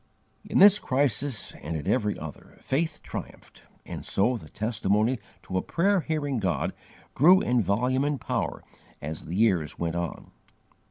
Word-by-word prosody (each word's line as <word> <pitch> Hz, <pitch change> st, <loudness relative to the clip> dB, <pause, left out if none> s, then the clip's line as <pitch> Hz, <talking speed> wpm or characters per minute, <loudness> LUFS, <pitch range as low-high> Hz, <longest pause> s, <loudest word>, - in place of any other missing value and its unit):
In -, -, -2 dB
this 205 Hz, +1 st, +8 dB
crisis, 135 Hz, -1 st, -1 dB
and 80 Hz, +2 st, -3 dB
in 75 Hz, -, -6 dB
every 105 Hz, -5 st, +1 dB
other, 80 Hz, -2 st, -10 dB
faith 160 Hz, +3 st, -1 dB
triumphed, -, -, -8 dB, 0.2 s
and -, -, -7 dB
so 110 Hz, +6 st, +1 dB
the 80 Hz, -10 st, -9 dB
testimony 110 Hz, +2 st, 0 dB, 0.2 s
to 95 Hz, -, -1 dB
a -, -, -2 dB
prayer 195 Hz, +2 st, +2 dB
hearing 145 Hz, -5 st, -1 dB
God 95 Hz, -4 st, -1 dB, 0.4 s
grew 180 Hz, +8 st, +7 dB
in 125 Hz, -6 st, +2 dB
volume 125 Hz, +7 st, +1 dB
and 145 Hz, -1 st, 0 dB
power -, -, -2 dB, 0.4 s
as 75 Hz, +2 st, -6 dB
the 85 Hz, -, -5 dB
years 95 Hz, -8 st, +2 dB
went 85 Hz, -1 st, -2 dB
on. 85 Hz, -1 st, -4 dB
115 Hz, 155 wpm, -27 LUFS, 95-145 Hz, 0.4 s, this